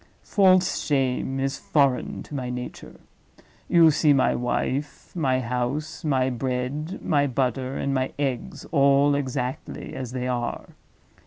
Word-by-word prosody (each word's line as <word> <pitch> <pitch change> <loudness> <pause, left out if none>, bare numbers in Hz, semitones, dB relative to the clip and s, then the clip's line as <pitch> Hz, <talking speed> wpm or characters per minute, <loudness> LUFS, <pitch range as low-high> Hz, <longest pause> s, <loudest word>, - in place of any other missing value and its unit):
False 185 -2 +3
shame 135 -1 0
is 135 0 -1
foreign 140 -4 +1
to - - -13
my 130 -3 -3
nature. 125 0 -7 0.7
You 165 -2 +6
see 150 0 +4
my 135 - +3
wife, 130 +6 -3
my 130 -6 +1
house, 125 +7 -3
my 130 -4 +1
bread, 130 +7 -3
my 145 -2 +2
butter, 130 0 -1
and 140 - -1
my 130 0 0
eggs, 135 -4 -3
all 140 -1 +4
exactly 130 -2 -3
as 130 -3 -5
they 125 0 -3
are. 120 -1 -3
135 Hz, 135 wpm, -25 LUFS, 125-145 Hz, 0.7 s, You